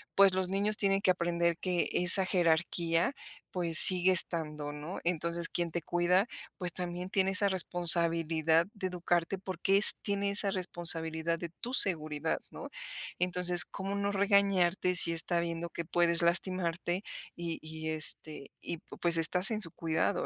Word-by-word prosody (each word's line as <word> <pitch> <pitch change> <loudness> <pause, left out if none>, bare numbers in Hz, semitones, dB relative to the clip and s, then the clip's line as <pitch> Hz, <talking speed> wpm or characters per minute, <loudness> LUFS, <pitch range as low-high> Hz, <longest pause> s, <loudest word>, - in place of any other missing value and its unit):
pues, 195 -1 +2
los 185 -1 -4
niños 205 +2 -1
tienen 195 -1 -1
que 190 - +1
aprender 170 -1 -3
que 180 -2 -4
esa 180 +2 +8
jerarquía, 170 - -2 0.4
pues, 170 -3 +1
sigue 185 0 +8
estando, 150 -4 +2
¿no? 150 +6 -10
Entonces, 170 0 -3
quien 170 -2 -5
te 170 - -6
cuida, 175 +4 -2 0.3
pues, 180 -2 -1
también 180 0 -8
tiene 190 0 -2
esa 200 +1 +2
responsabilidad 165 -2 +1
de 195 -3 -7
educarte, 175 +1 -4
porque 190 +1 -3
es 205 - +9
tiene 200 -1 -4
esa 200 -1 +5
responsabilidad 165 -3 -3
de 170 -1 -8
tu 245 +2 -7
seguridad, 155 - 0
¿no? - - -12 0.5
Entonces, 180 -1 0
¿cómo 195 +1 -8
no 200 0 -4
regañarte 195 -3 -1
si 170 -1 +5
está 170 +1 0
viendo 170 0 -7
que 170 0 -9
puedes 170 0 -2
lastimarte 175 +1 -2 0.3
y 170 -1 -8
y, 160 0 -9
este 155 -2 -5
y, 170 - -8
pu - - -17
pues, 170 -1 +3
estás 180 +6 +3
en 215 - -5
su 165 -5 -3
cuidado, 165 +3 -4
175 Hz, 155 wpm, -28 LUFS, 165-190 Hz, 0.5 s, es